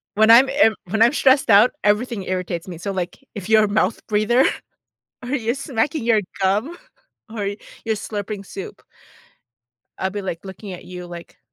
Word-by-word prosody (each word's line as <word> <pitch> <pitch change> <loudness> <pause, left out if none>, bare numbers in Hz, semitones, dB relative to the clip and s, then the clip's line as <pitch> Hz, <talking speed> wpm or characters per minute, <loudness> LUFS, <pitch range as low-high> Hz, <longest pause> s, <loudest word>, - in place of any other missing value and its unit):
When 220 +1 +4
I'm 245 +4 +8
in 270 -6 +3
when 220 +4 -1
I'm 235 +4 +6
stressed 270 -2 +3
out, 210 +3 +7
everything 210 0 +1
irritates 180 -2 -3
me, 175 -3 -7
so 200 +4 -4
like, 185 -2 -4 0.2
if 200 -4 -7
you're 220 0 +5
a - - +2
mouth 210 0 0
breather, 215 +5 +3 0.8
or 245 - -6
you're 240 -4 0
smacking 275 0 -2
your 230 -2 +3 0.2
gum, 210 - 0 0.5
or 210 -3 -4 0.4
you're 220 -1 0
slurping 205 -1 -5
soup, 190 0 -9 1.2
I 190 - -1
be, 205 +1 -5
like, 180 -2 -5
looking 190 +1 -8
at 180 - -10
you, 180 -1 -9
like, 170 -1 -11
215 Hz, 170 wpm, -21 LUFS, 190-235 Hz, 1.2 s, I'm